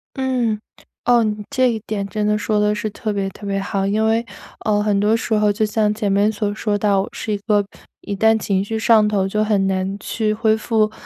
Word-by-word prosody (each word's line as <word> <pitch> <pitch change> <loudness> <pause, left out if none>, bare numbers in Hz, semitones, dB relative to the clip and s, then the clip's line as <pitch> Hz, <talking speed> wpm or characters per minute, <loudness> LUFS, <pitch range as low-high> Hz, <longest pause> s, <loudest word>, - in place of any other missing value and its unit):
嗯， 250 -5 0 0.5
哦， 240 -1 +4
你 215 -1 -1
这 255 -1 +2
一 225 - -3
点 205 -2 -2
真 210 +1 -2
的 210 0 +2
说 210 0 0
得 210 0 +2
是 215 +1 -3
特 215 +1 -4
别 195 -1 -1
特 205 - -12
别 200 0 -1
好。 195 0 -2
因 215 +2 +1
为， 225 +1 +1 0.4
呃， 210 -1 +2
很 205 -1 +1
多 210 +2 +3
时 230 - -2
候 210 -1 +3
就 215 +1 +1
像 210 0 +1
前 210 -2 -1
面 200 +2 +3
所 210 -1 -2
说 210 -1 -1
到， 205 -2 +2
我 195 - -5
是 225 -4 -4
一 205 - 0
个 205 -2 +3 0.4
一 205 - -5
旦 220 +2 +3
情 195 -3 0
绪 220 +2 -3
上 220 -1 +4
头 200 -2 +1
就 210 +2 -1
很 210 -3 +2
难 190 +1 -1
去 215 -2 -1
恢 220 0 +2
复 220 -1 +1
210 Hz, 250 characters per minute, -20 LUFS, 205-220 Hz, 0.5 s, 哦